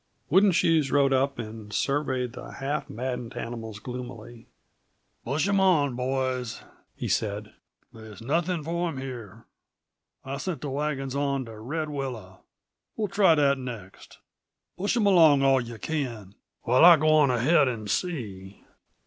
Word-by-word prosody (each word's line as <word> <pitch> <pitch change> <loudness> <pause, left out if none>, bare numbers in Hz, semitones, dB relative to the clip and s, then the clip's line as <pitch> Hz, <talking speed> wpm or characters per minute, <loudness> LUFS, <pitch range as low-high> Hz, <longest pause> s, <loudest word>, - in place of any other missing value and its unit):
Wooden 195 +4 +6
Shoes 160 -5 +2
rode 140 -1 +3
up 135 +1 +1
and 110 -2 -8
surveyed 130 -1 -1
the - - -9
half 140 +1 -3
maddened 125 0 -5
animals 115 -2 -6
gloomily. 120 -1 -9 0.8
"Push 145 +8 0
'em 200 0 +2
on, 155 -9 +3
boys," 130 -2 -2 0.3
he - - -4
said. 105 0 -2 0.4
"They's 110 -2 -12
nothings 165 +6 -1
for 170 +1 -1
'em 150 - -6
here. 120 -5 -8 0.8
I've 135 +1 -4
sent 185 -4 -4
the 145 - -4
wagons 135 -2 -2
on 140 -2 -1
to 110 -2 -10
Red 155 +7 -3
Willow; 120 -10 -6 0.6
we'll 210 -2 -1
try 195 -4 +4
that 140 -2 +2
next. 115 -7 -9 0.6
Push 205 +6 -1
'em 220 - +2
along 160 -8 +6
all 135 -1 +4
yuh 120 -1 -8
can, 120 -10 -4 0.3
while 125 +5 +4
I 170 -1 +10
go 155 +1 +2
on 155 -3 +5
ahead 130 +5 +3
and 115 -4 -4
see." 100 - -4
135 Hz, 150 wpm, -26 LUFS, 115-155 Hz, 0.8 s, I